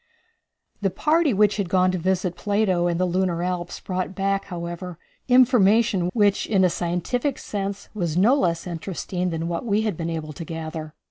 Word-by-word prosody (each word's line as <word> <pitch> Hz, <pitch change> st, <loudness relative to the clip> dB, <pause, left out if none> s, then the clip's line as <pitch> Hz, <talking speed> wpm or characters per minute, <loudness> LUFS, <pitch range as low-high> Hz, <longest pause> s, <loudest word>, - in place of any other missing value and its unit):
The 195 Hz, -, +2 dB
party 305 Hz, -, +2 dB
which 210 Hz, -1 st, +3 dB
had 200 Hz, -4 st, -2 dB
gone 185 Hz, 0 st, +3 dB
to 185 Hz, -, -2 dB
visit 180 Hz, 0 st, 0 dB
Plato 190 Hz, -2 st, +1 dB
and 170 Hz, 0 st, -1 dB
the 185 Hz, -, +2 dB
lunar 180 Hz, -1 st, 0 dB
Alps 180 Hz, -1 st, -3 dB
brought 185 Hz, 0 st, -3 dB
back, 195 Hz, 0 st, 0 dB
however, 175 Hz, -1 st, -6 dB, 0.3 s
information 230 Hz, -7 st, +4 dB
which, 205 Hz, -3 st, +2 dB
in 195 Hz, -4 st, +3 dB
a 180 Hz, -, +4 dB
scientific 180 Hz, -, -1 dB
sense, 200 Hz, -1 st, -4 dB
was 175 Hz, -6 st, -2 dB
no 215 Hz, +8 st, +5 dB
less 170 Hz, -, +1 dB
interesting 180 Hz, +1 st, -3 dB
than 165 Hz, 0 st, -3 dB
what 170 Hz, -1 st, -3 dB
we 215 Hz, -2 st, +1 dB
had 215 Hz, -5 st, -1 dB
been 165 Hz, +1 st, -3 dB
able 155 Hz, -2 st, -4 dB
to 165 Hz, -, -7 dB
gather. 160 Hz, -1 st, -6 dB
185 Hz, 180 wpm, -24 LUFS, 170-205 Hz, 0.3 s, no